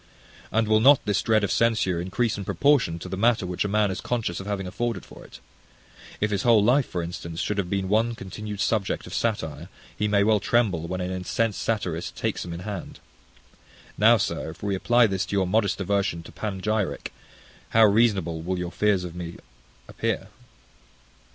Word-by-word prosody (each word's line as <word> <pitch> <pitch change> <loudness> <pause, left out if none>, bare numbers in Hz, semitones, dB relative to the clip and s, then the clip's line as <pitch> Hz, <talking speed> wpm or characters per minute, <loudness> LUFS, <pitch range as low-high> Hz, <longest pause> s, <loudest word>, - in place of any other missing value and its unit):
And 110 0 +1
will 110 0 +4
not 135 +4 +6
this 105 -2 +1
dread 110 -2 +2
of 100 - 0
censure 110 -7 +1
increase 100 +6 -1
in 100 - -5
proportion 135 - +2
to 85 - -8
the 95 - -4
matter 115 0 +2
which 90 -1 -2
a - - -1
man 105 0 +2
is 95 - -4
conscious 110 -8 -2
of 95 - -8
having 100 -2 -2
afforded 115 +5 -3
for - - -13
it? - - -13 0.8
If 105 0 0
his 100 - 0
whole 115 -5 +5
life, 125 +5 +3
for 90 - -3
instance, 85 -1 -6
should 105 -1 -1
have 90 -3 -2
been 95 -1 -1
one 115 +4 +1
continued 105 +1 -6
subject 105 -3 0
of - - -9
satire, 105 -9 -2 0.3
he 105 - 0
may 100 -1 +3
well 110 0 +3
tremble 95 -6 +1
when 95 +1 -3
an 90 +1 -3
incensed 95 +4 -1
satirist 90 -7 -2
takes - - -2
him 85 - -7
in 85 +1 -6
hand. 100 -2 -6 1.0
Now, - - +6
sir, - - -2
if - - -11
we 100 -1 0
apply 120 +5 +4
this 95 -3 0
to 100 - -3
your 95 -1 +2
modest 100 +2 +1
aversion 100 -3 -1
to - - -12
panegyric, 105 0 -2 0.6
how 115 0 +6
reasonable 100 -7 +2
will 90 +3 -2
your 90 -1 -4
fears 105 -3 +1
of 90 -2 -6
me 85 -1 -6 0.5
appear! - - -3
100 Hz, 195 wpm, -25 LUFS, 90-110 Hz, 1.0 s, not